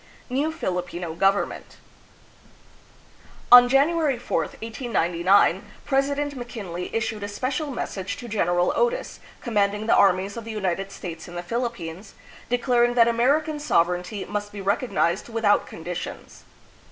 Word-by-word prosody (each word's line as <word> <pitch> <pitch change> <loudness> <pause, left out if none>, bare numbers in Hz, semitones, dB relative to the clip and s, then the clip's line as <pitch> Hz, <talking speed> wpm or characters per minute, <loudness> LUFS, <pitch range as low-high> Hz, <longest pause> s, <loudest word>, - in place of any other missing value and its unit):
New 285 +5 0
Filipino 180 - -4
Government. 195 +4 0 1.7
On 245 0 +10
January 285 +1 +3
4, 240 - -2
1899, 195 - +1 0.2
President 285 +1 0
McKin 235 -8 -7
ley 180 +1 -4
issued 220 -1 -2
a 205 - -3
spe 205 +4 -10
cial 295 +2 -3
message 200 -6 -4
to 245 - -8
General 175 -5 +1
Otis, 485 +1 -1 0.2
com 235 - -6
manding 205 +1 +1
the 230 - +3
armies 195 +1 +3
of 230 - -5
the 225 - -9
United 195 -2 -2
States 165 -4 -8
in 175 - -10
the 175 - -4
Philippines, 200 -4 -5 0.3
declaring 240 0 +2
that 235 -1 +6
American 285 +7 +2
sover 180 - +2
eignty 180 +3 -6
must 205 0 -4
be 205 - -8
recognized 200 -2 0
without 225 -3 +2
conditions. 175 +2 -7
215 Hz, 140 wpm, -24 LUFS, 180-245 Hz, 1.7 s, On